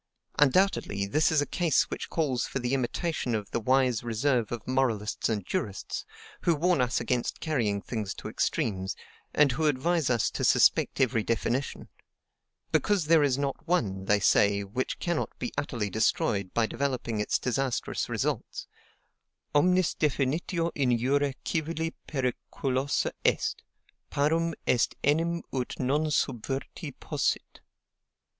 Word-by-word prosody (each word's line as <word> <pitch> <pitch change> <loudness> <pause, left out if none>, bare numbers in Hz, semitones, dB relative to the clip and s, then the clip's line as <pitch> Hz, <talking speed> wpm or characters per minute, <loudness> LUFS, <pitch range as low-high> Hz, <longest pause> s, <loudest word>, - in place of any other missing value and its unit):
Undoubtedly, 145 - +3
this 155 +12 +2
is 150 -2 +3
a - - -4
case 170 0 +1
which - - -4
calls 140 -7 0
for 135 - -3
imitation 130 +1 -1
of 105 -2 -4
the - - 0
wise 125 0 +2
reserve 120 0 0
of 120 -2 -5
moralists 120 -5 0
and 105 -4 -1
jurists, 120 - -3 0.3
who 170 - +3
warn 170 0 +2
us 125 -1 +1
against 120 +1 -1
carrying 110 -10 0
things 105 -5 -4
to - - -7
extremes, 95 -3 -1 0.4
and 145 -2 +4
who 155 +6 0
advise 155 +3 +1
us 120 -3 +2
to - - -3
suspect - - +4
every 115 -4 +3
definition; 115 +4 -2 0.8
because 200 -6 +2
there 160 0 +5
is 140 -3 +2
not 140 +3 -3
one, 100 - 0
they 105 +1 +3
say, 100 0 +3
which 115 +7 -3
cannot 170 -2 -2
be 120 - -4
utterly 120 -7 -2
destroyed 100 -2 0
by 115 - +2
developing 125 -3 -2
its 105 - +1
disastrous 130 0 -1
results - - -2 0.9
Omnis 180 +4 +3
definitio 155 +4 0
in 125 -4 +2
jure 140 +4 +1
civili 165 0 -2
periculosa 130 0 -1
est: - - +1 0.5
parum 160 +3 +1
est 120 - +2
enim 165 +4 +1
ut 130 -2 -3
non 145 +4 +1
subverti 135 +2 -2
possit. - - -2
130 Hz, 135 wpm, -28 LUFS, 115-155 Hz, 0.9 s, there